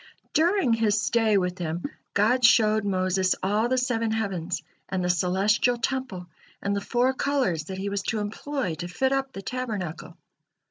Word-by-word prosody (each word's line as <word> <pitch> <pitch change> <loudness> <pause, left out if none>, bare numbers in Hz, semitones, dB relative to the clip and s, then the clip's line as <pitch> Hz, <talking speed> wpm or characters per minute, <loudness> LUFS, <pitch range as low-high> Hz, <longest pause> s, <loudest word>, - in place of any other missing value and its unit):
During 335 - +3
his 220 -2 +2
stay 220 -1 +2
with 180 -1 -1
Him, 170 0 -3 0.3
God 245 +5 +3
showed 215 -2 +5
Moses 185 -1 +1
all 210 +5 +1
the 255 - +1
seven 235 -3 0
heavens, 190 -6 -2 0.3
and 185 -1 -1
the 180 - +3
celestial 195 +7 +2
temple, 235 -7 -3 0.3
and 200 0 -1
the 200 - -1
four 245 +5 +1
colors 260 - 0
that 190 +3 -6
he 195 +1 -3
was 200 0 -2
to 225 - 0
employ 215 - -3
to 175 - -4
fit 265 +9 0
up 270 0 0
the 195 - -8
tabernacle. 210 -11 -5
210 Hz, 170 wpm, -26 LUFS, 185-245 Hz, 0.3 s, showed